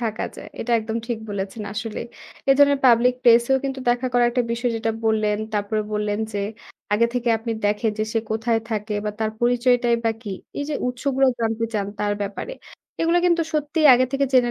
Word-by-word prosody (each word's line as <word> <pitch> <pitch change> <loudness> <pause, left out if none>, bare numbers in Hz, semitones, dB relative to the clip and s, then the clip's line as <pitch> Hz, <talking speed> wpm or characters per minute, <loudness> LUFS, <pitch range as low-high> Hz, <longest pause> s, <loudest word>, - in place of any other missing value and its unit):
থাকা 220 -2 -2
যায়। - - -9
এটা 240 - -2
একদম 220 +1 -4
ঠিক 235 -3 -2
বলেছেন 200 +2 -4
আসলেই। 220 +2 -5 0.4
এই 270 - +7
ধরনের 285 -1 +5
পাবলিক 245 +1 +5
প্লেসেও 235 +2 +5
কিন্তু 270 -1 -3
দেখা 245 +1 0
করা 245 0 +4
একটা 250 +1 +1
বিষয় 240 +1 -1
যেটা 225 0 -1
বললেন। 215 -1 +1 0.2
তারপরে 210 +1 0
বললেন 210 0 -1
যে 205 - -2 0.5
আগে 235 +3 +4
থেকে 245 -1 -1
আপনি 230 +1 -3
দেখেন 210 +2 +1
যে, 215 - +1
সে 225 - +2
কোথায় 225 +1 +1
থাকে 210 -1 -2
বা 210 - -1
তার 220 -1 0
পরিচয়টাই 245 0 +3
বা 225 - +3
কি। 205 -4 -5 0.3
এই 285 - -1
যে 300 - -2
উৎসগুলো 270 +2 +1
জানতে 225 0 0
চান 200 -2 0
তার 205 0 0
ব্যাপারে। 205 - -5 0.5
এগুলা 335 +2 +3
কিন্তু 340 -1 +3
সত্যিই 305 +1 +2
আগে 255 +1 +3
থেকে 275 0 +2
জেনে 250 -2 +4
235 Hz, 195 wpm, -22 LUFS, 215-255 Hz, 0.5 s, এই